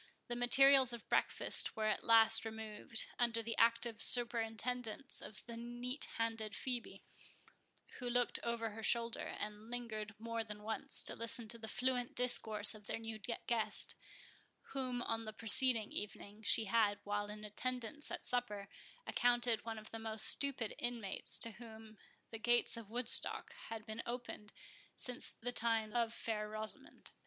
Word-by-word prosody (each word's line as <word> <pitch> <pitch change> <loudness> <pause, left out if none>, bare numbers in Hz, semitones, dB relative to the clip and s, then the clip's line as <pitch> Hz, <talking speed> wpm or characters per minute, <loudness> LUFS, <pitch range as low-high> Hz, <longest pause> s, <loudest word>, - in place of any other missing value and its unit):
The 240 - -3
materials 265 +1 +5
of 235 - -9
breakfast - - +2
were 220 - -3
at 215 - -1
last 225 -1 +5
removed, 220 0 -3
under 230 -1 0
the 230 0 -4
active 230 -1 +1
superintendence 240 +1 +1
of 195 -3 -11
the 235 - -9
neat 240 +4 -1
handed 225 -2 -3
Phœbe, 240 -6 -5 1.0
who 250 -2 -5
looked 245 0 0
over 235 -1 -3
her 220 +2 -9
shoulder, 230 +1 -1
and 210 +1 -7
lingered 220 -4 -6
more 230 +1 -4
than 210 -1 -10
once, 225 +6 0
to - - 0
listen 230 0 -4
to 235 0 -1
the 220 - -8
fluent 250 +1 -2
discourse 220 -4 +6
of 210 -2 -13
their - - -4
new 225 -1 -8
guest, 225 0 +2 0.8
whom, 255 -3 -3
on 225 0 -2
the 220 -1 -7
preceding 230 0 0
evening, 205 0 -7
she 220 0 +3
had, 210 -1 +1
while 205 0 -3
in 210 0 -9
attendance 250 +6 -5
at - - -7
supper, 210 -5 -3 0.4
accounted 240 -2 +1
one 225 -1 -5
of 215 0 -10
the 225 - -7
most 220 -1 +3
stupid 270 -6 +2
inmates 235 -5 +5
to 230 - +4
whom 220 0 -13 0.4
the 225 - -8
gates 240 +1 +2
of 230 -3 -10
Woodstock 240 +1 +3 0.2
had 220 -1 -7
been 220 0 -6
opened 235 -3 -7 0.4
since 250 -1 +2
the 245 +2 -7
times 225 -2 -1
of 235 -2 0
Fair 215 -2 -4
Rosamond. 215 0 -5
230 Hz, 155 wpm, -36 LUFS, 215-240 Hz, 1.0 s, discourse